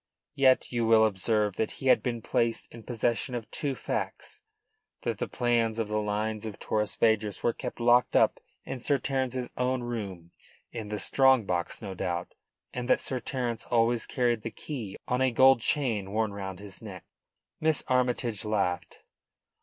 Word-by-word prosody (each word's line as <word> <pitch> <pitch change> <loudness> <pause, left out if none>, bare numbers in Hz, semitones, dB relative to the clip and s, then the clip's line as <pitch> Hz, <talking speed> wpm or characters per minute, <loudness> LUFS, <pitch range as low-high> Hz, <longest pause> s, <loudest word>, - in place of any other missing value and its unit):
Yet 135 -3 +3
you 120 -1 0
will 110 -1 +6
observe 105 0 +1
that 110 - -1
he - - -9
had 130 - +5
been 120 -3 -3
placed 115 -1 0
in 115 - -10
possession 120 +2 -1
of 115 -2 -4
two 140 -3 -2
facts: - - -4 0.6
that - - -2
the - - -1
plans 115 -2 +1
of 115 -2 -1
the 105 0 0
lines 105 +1 -2
of 110 -2 -6
Torres 105 -1 -1
Vedras 110 -2 +1
were 120 - +2
kept 125 0 -6
locked 120 +1 +4
up - - +4 0.3
in 135 - -5
Sir 140 +3 +2
Terence's 130 -2 -2
own 125 0 0
room 100 -8 -5 0.4
in 110 -3 -6
the 105 - -2
strong 130 +1 +4
box, 90 +4 -2
no 100 -2 -5
doubt 90 -2 -3 0.4
and 125 0 -4
that - - +5
Sir 130 - -2
Terence 120 -2 -3
always 115 0 +2
carried 120 -3 +1
the 115 - -4
key 115 -3 -6
on 125 +1 0
a 130 - +4
gold 130 +1 +6
chain 110 -9 0
worn 110 -1 0
round 95 -2 -5
his 100 0 -11
neck. 95 -5 -9 0.5
Miss 155 -2 +2
Armytage 125 -4 +1
laughed. 100 -5 -1
115 Hz, 175 wpm, -28 LUFS, 105-125 Hz, 0.6 s, will